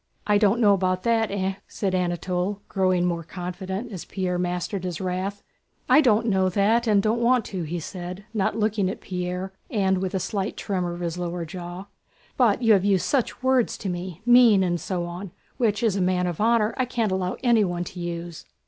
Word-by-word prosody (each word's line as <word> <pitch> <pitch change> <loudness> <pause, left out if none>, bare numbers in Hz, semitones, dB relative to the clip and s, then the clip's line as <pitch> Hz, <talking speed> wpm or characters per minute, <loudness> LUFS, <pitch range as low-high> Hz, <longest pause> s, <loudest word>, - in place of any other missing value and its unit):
"I 205 -1 +3
don't 210 +2 +3
know 210 -4 +5
about 185 -1 0
that, 225 -2 +2
eh?" 195 -1 -2
said 195 -3 -2
Anatole, 180 +2 -1
growing 185 -2 +1
more 170 -1 -1
confident 190 +6 -5
as 185 -5 -6
Pierre 180 -2 -2
mastered 180 +2 -2
his 180 -3 -4
wrath. 190 +2 -3 0.4
"I 300 - +6
don't 230 -5 +3
know 190 -4 +2
that 215 +5 +2
and 205 -2 +4
don't 225 +2 +1
want 245 -1 +3
to," 185 - -2
he 170 +2 -3
said, 180 +4 -7
not 205 0 0
looking 210 -3 +1
at - - -5
Pierre 180 +1 -4 0.2
and 190 -3 +1
with 190 +1 -2
a - - +1
slight 195 +2 -3
tremor 180 -4 -2
of 175 - -8
his 170 0 -3
lower 175 -1 -3
jaw, 175 +2 -7 0.5
"but 240 -2 +3
you 225 -1 +6
have 195 -3 +3
used 195 -2 +2
such 255 -2 -1
words 260 -2 +2
to 195 - -4
me—'mean' 195 +5 +4
and 175 -2 -1
so 180 -2 -2
on—which 200 +5 -3
as 220 -4 +2
a 195 - 0
man 180 0 +1
of 175 +1 -3
honor 225 -1 +3
I 255 - +1
can't 230 -4 -1
allow 185 -1 -1
anyone 205 -8 +2
to 180 +1 -8
use." 170 -1 -5
190 Hz, 195 wpm, -25 LUFS, 180-215 Hz, 0.5 s, I